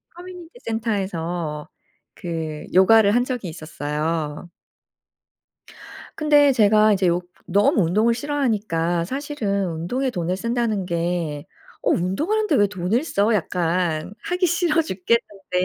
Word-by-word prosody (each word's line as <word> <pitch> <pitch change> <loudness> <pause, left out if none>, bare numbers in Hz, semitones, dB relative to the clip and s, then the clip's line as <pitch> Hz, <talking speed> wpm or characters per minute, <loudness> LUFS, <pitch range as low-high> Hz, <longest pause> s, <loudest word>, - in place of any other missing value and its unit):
커뮤니티 355 -1 -10
센터에서 175 -8 -3 0.5
그 160 -3 -5
요가를 200 +2 +6
한 245 - +3
적이 245 -9 -4
있었어요. 155 0 -4 1.7
근데 295 -2 +4
제가 215 -2 +4
이제 190 -2 +1
요 175 +1 +1 0.2
너무 200 +2 +3
운동을 215 +8 +2
싫어하니까 215 - -1
사실은 225 - -2
운동에 245 +12 -2
돈을 180 -2 -2
쓴다는 230 -3 -1
게 170 -4 -2 0.4
'어 - - 0
운동을 195 - 0
하는데 425 -9 +1
왜 205 - +4
돈을 200 - -1
써?' 215 -7 +1
약간 175 -2 -1
'하기 360 +1 0
싫어 340 -2 +2
죽겠는데 195 - -2
200 Hz, 265 characters per minute, -22 LUFS, 170-245 Hz, 1.7 s, 요가를